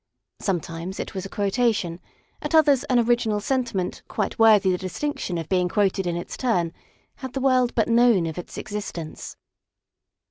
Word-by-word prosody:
Sometimes 175 Hz, -1 st, -3 dB
it -, -, -5 dB
was 195 Hz, -1 st, -4 dB
a -, -, -19 dB
quotation; 205 Hz, -4 st, 0 dB, 0.4 s
at -, -, -1 dB
others 290 Hz, -4 st, +5 dB
an 255 Hz, -, +2 dB
original 235 Hz, -3 st, +2 dB
sentiment 230 Hz, -6 st, -2 dB
quite 210 Hz, 0 st, -3 dB
worthy 215 Hz, -4 st, +6 dB
the 180 Hz, -, +1 dB
distinction 185 Hz, -1 st, -3 dB
of 165 Hz, -2 st, -4 dB
being 180 Hz, -1 st, +1 dB
quoted 195 Hz, -1 st, +1 dB
in 170 Hz, -, -1 dB
its 175 Hz, -, -6 dB
turn 180 Hz, -10 st, 0 dB, 0.4 s
had 260 Hz, -2 st, -7 dB
the 270 Hz, -, -2 dB
world 255 Hz, -2 st, +2 dB
but 225 Hz, -, +2 dB
known 235 Hz, -6 st, +4 dB
of 160 Hz, +1 st, -4 dB
its 175 Hz, -, -9 dB
existence. 200 Hz, -6 st, -6 dB
205 Hz, 165 wpm, -24 LUFS, 180-240 Hz, 0.4 s, worthy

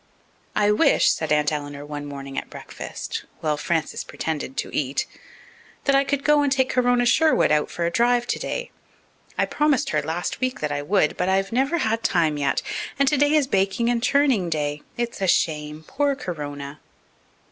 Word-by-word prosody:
"I 210 Hz, 0 st, +3 dB
wish," 210 Hz, -, +4 dB
said 160 Hz, -1 st, -2 dB
Aunt 150 Hz, 0 st, +3 dB
Eleanor 145 Hz, -1 st, -5 dB
one 145 Hz, 0 st, -6 dB
morning 140 Hz, -1 st, -7 dB
at -, -, -4 dB
breakfast, -, -, -7 dB, 0.2 s
while 155 Hz, -1 st, +1 dB
Frances 160 Hz, +1 st, -2 dB
pretended 150 Hz, -4 st, -4 dB
to -, -, -3 dB
eat, 140 Hz, -1 st, 0 dB, 0.8 s
"that 275 Hz, -, +2 dB
I 275 Hz, -, +5 dB
could 280 Hz, 0 st, -1 dB
go 300 Hz, 0 st, +4 dB
and 285 Hz, -1 st, +1 dB
take 265 Hz, -1 st, +2 dB
Corona 245 Hz, -1 st, +2 dB
Sherwood 315 Hz, -, +4 dB
out 150 Hz, -1 st, +2 dB
for 170 Hz, -, -2 dB
a 170 Hz, -, 0 dB
drive 240 Hz, +3 st, +2 dB
today. -, -, -3 dB, 0.7 s
I -, -, +3 dB
promised 295 Hz, -3 st, +1 dB
her 150 Hz, -, +1 dB
last 160 Hz, +4 st, -3 dB
week 255 Hz, 0 st, -1 dB
that 150 Hz, -1 st, -2 dB
I 145 Hz, 0 st, -1 dB
would, 165 Hz, 0 st, +1 dB
but 180 Hz, -, 0 dB
I've 195 Hz, +1 st, +1 dB
never 270 Hz, +7 st, +1 dB
had 225 Hz, -6 st, 0 dB
time 160 Hz, -5 st, +2 dB
yet. 140 Hz, -1 st, 0 dB, 0.3 s
And 275 Hz, 0 st, +3 dB
today 290 Hz, +2 st, +3 dB
is 300 Hz, -3 st, +4 dB
baking 200 Hz, +1 st, +1 dB
and 235 Hz, -1 st, 0 dB
churning 255 Hz, -8 st, +2 dB
day. 150 Hz, -2 st, -2 dB, 0.2 s
It's 235 Hz, -3 st, -3 dB
a 190 Hz, -, +1 dB
shame. 150 Hz, -2 st, 0 dB
Poor 285 Hz, -, 0 dB
Corona!" 145 Hz, -, -6 dB
190 Hz, 180 wpm, -23 LUFS, -, 0.8 s, I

